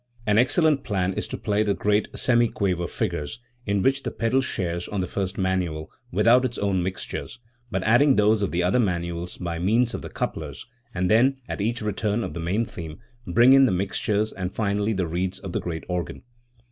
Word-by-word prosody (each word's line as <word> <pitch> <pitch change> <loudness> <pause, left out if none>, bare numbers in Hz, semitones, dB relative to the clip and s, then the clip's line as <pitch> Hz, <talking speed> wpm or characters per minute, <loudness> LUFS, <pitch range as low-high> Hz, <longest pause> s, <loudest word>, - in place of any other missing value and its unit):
An 105 +1 +3
excellent 145 +3 +3
plan 95 -3 -1
is - - -3
to - - -5
play 105 0 0
the 105 -2 +1
great 105 +1 +1
semiquaver 100 -8 +1
figures, 90 0 -3 0.3
in 100 -1 +1
which 135 +1 +2
the - - -3
pedal 115 +4 +1
shares, 85 -8 -3
on 100 - -3
the 90 - 0
first 95 +1 -3
manual, 90 -5 -1 0.2
without 125 +3 +4
its 125 -2 -2
own 100 -3 0
mixtures, 95 +5 -5 0.3
but 95 -4 -2
adding 125 +6 +5
those 105 +1 +3
of 100 - 0
the 90 +1 0
other 95 +7 +2
manuals 85 -4 -2
by 85 -2 -4
means 115 +7 +2
of - - -4
the - - -7
couplers, 70 -4 -4 0.3
and 90 -3 -1
then, 130 +5 +4
at - - -4
each 115 +2 -1
return 105 +2 -1
of - - -5
the 85 - -5
main 95 +8 0
theme, 80 -6 -8 0.3
bring 120 +8 +6
in 135 -1 +7
the - - +1
mixtures 100 +3 -1
and 90 -2 -4
finally 105 0 0
the 95 -3 -1
reeds 90 +3 -2
of 95 - -7
the - - -1
great 80 -2 -4
organ. 90 -3 -4
100 Hz, 200 wpm, -25 LUFS, 90-115 Hz, 0.3 s, in